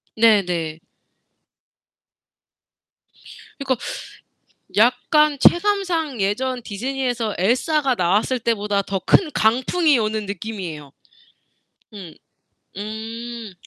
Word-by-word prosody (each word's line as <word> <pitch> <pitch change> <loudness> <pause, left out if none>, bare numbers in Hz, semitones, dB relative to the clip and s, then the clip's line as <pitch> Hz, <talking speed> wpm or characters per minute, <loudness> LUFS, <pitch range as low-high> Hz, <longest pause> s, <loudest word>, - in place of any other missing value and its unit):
네네. 180 -8 +2 2.8
그니까 270 -2 0 1.0
약간 275 +6 +3
체감상 345 - +2
예전 245 +5 -1
디즈니에서 245 0 -3
엘사가 260 - +1
나왔을 205 +6 +1
때보다 205 -3 0
더 195 -1 -3
큰 330 -6 +4
강풍이 260 +6 +2
오는 215 -1 -1
느낌이에요. 185 -8 -6 1.0
음. 185 -6 -10 0.6
음. 225 +1 -7
225 Hz, 175 characters per minute, -21 LUFS, 200-265 Hz, 2.8 s, 큰